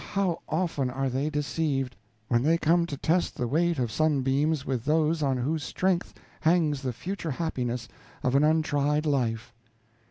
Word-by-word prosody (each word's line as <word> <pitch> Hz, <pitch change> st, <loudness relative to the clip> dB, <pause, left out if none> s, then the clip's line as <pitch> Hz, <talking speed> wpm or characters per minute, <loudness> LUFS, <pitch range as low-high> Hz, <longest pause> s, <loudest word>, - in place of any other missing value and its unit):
how 195 Hz, -4 st, 0 dB
often 155 Hz, -6 st, 0 dB
are 135 Hz, +1 st, -2 dB
they 135 Hz, +4 st, 0 dB
deceived, 145 Hz, -3 st, -1 dB, 0.3 s
when 120 Hz, +1 st, +2 dB
they 160 Hz, +5 st, +3 dB
come 170 Hz, +1 st, +2 dB
to 145 Hz, -, -5 dB
test 170 Hz, +5 st, +1 dB
the 120 Hz, -, -2 dB
weight 170 Hz, +5 st, +1 dB
of 120 Hz, -4 st, -1 dB
sunbeams 145 Hz, 0 st, +1 dB
with 130 Hz, -4 st, -2 dB
those 155 Hz, +2 st, +2 dB
on 135 Hz, -3 st, +1 dB
whose 145 Hz, +5 st, -1 dB
strength 185 Hz, +1 st, 0 dB, 0.3 s
hangs 155 Hz, -4 st, +2 dB
the 130 Hz, -2 st, -2 dB
future 170 Hz, -, -5 dB
happiness 125 Hz, -5 st, -2 dB, 0.4 s
of 125 Hz, -, +1 dB
an 140 Hz, +2 st, +4 dB
untried 150 Hz, -1 st, +2 dB
life." 120 Hz, -5 st, -1 dB
150 Hz, 160 wpm, -27 LUFS, 130-160 Hz, 0.4 s, an